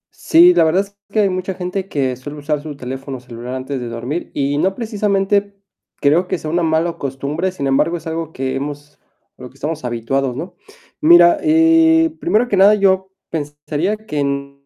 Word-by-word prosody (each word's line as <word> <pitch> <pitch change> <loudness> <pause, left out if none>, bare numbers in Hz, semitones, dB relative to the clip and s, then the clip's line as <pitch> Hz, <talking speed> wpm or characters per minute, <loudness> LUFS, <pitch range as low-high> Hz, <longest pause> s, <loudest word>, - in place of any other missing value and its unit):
Sí, 345 +2 +5
la - - +4
verdad 175 +5 +2
es 200 0 -18 0.2
que 215 +1 +2
hay 200 - +2
mucha 185 0 -3
gente 185 +1 -4
que 130 -3 -1
suele 145 +3 -9
usar 150 0 -2
su 150 -2 -8
teléfono 135 +1 -6
celular 125 +1 -8
antes 130 +1 -4
de 120 - -5
dormir, 120 +8 -4
y 145 +1 0
no 190 +3 +1
precisamente 200 -3 0 0.4
creo 160 +6 +2
que - - -1
sea 155 -1 -5
una 175 - +1
mala 165 +1 +1
costumbre. 140 +7 -3
Sin 140 -7 -5
embargo, 150 +6 +1
es 165 - -13
algo 160 0 -4
que 130 -2 -3
hemos 145 +1 -6 0.4
a - - -14
lo 125 - -8
que - - -25
estamos 150 +2 -4
habituados, 125 +2 -2
¿no? 170 +6 -7 0.5
Mira, 175 +2 +6
eh, 325 0 +4
primero 245 -8 +1
que 200 -5 0
nada, 200 +2 +6
yo 190 -1 +1 0.2
pensaría 150 +5 -3
que 150 -10 -3
no 140 0 -3
160 Hz, 190 wpm, -18 LUFS, 140-195 Hz, 0.5 s, Mira